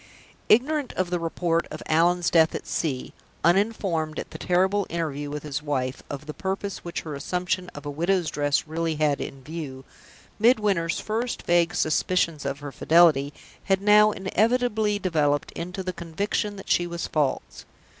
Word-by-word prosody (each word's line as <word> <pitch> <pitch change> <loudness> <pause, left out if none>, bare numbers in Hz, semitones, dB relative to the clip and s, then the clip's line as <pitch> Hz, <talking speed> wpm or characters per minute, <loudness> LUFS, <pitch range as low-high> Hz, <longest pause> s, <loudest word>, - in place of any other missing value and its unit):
Ignorant 275 +4 +3
of 185 -1 -2
the 175 - 0
report 165 0 0
of - - -7
Allan's 175 +2 +2
death 160 -1 +4
at - - -5
sea; 135 -6 -2 0.3
uninformed, 175 -4 +1
at - - -5
the - - -8
terrible 190 +3 +1
interview 150 -3 -3
with 150 0 -5
his 145 -2 -3
wife, 135 -3 -2
of 145 +1 -6
the 150 - -6
purpose 195 +2 -3
which 170 - -4
her 155 - -6
assumption 180 +5 -2
of 145 0 -9
a - - -3
widow's 170 +3 0
dress 145 -1 +1
really 165 0 -1
had 150 -2 +1
in 135 -1 -7
view, 135 -3 -7 0.5
Midwinter's 205 -7 +3
first 230 +3 -3
vague 175 0 +2
suspicions 160 -1 +1
of 140 +1 -3
her 145 -1 -6
fidelity 155 -3 +4 0.3
had 195 -1 +2
now 210 +1 +6
inevitably 215 +2 +1
developed 150 -7 0
into 180 +3 -5
the 185 0 -3
conviction 200 +5 -2
that 195 - -10
she 175 - +3
was 170 0 -4
false. 145 -4 -2
170 Hz, 165 wpm, -25 LUFS, 150-195 Hz, 0.5 s, now